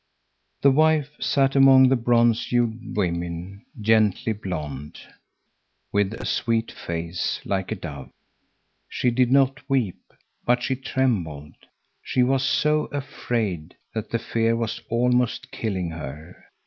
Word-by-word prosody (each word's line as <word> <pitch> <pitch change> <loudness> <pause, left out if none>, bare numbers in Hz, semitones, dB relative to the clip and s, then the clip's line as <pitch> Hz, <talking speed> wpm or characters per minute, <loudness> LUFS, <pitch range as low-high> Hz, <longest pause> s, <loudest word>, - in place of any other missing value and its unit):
The 140 - +7
wife 155 0 +3
sat 135 -1 +1
among 135 -1 +7
the 135 - +4
bronze 120 -1 +2
hued 120 -2 -1
women, 85 +1 -3 0.2
gently 110 +1 +2
blonde, 75 -8 -6 0.9
with 100 +1 +1
a - - -7
sweet 115 -1 0
face 85 +1 -3
like 95 0 -2
a - - 0
dove. 75 -8 -8 0.8
She 125 - 0
did 125 +1 +2
not 135 +1 +3
weep, 125 -9 0 0.4
but 120 0 +2
she 130 - 0
trembled. 95 - -2 0.5
She 125 - +1
was 130 +1 +2
so 150 +3 +2
afraid, 110 - -3 0.2
that 110 -1 -4
the 115 - 0
fear 115 0 0
was 115 -1 -3
almost 125 +1 +1
killing 95 -6 -3
her. 80 +2 -9
115 Hz, 125 wpm, -24 LUFS, 90-130 Hz, 0.9 s, The